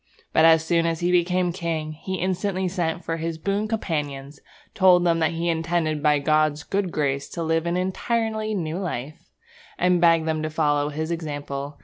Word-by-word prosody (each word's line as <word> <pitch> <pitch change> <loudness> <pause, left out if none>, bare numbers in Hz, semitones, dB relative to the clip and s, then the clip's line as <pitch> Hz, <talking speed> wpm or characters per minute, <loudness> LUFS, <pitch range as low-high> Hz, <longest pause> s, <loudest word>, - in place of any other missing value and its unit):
But, 160 - +5
as 160 0 +5
soon 170 0 +2
as 165 0 -2
he 175 +1 +1
became 180 0 +2
king, 165 -3 -3
he 190 +5 -5
instantly 185 +1 -1
sent 175 -2 -2
for 165 - -2
his 165 0 -3
boon 200 +5 -1
companions, 145 -9 -3 0.3
told 185 -2 +5
them 170 -1 +2
that 160 0 +1
he 165 +1 -2
intended 165 -2 0
by 150 0 +4
God's 155 0 +1
good 195 -2 -2
grace 140 -2 -1
to 170 - -4
live 165 +1 0
an 170 +1 0
entirely 220 +3 -1
new 165 -2 -3
life, 155 -6 -6 0.5
and 180 -1 +2
begged 165 -2 +4
them 155 -1 0
to 155 - -2
follow 150 -2 +1
his 155 +2 -4
example. 145 -3 -5
165 Hz, 180 wpm, -24 LUFS, 155-180 Hz, 0.5 s, But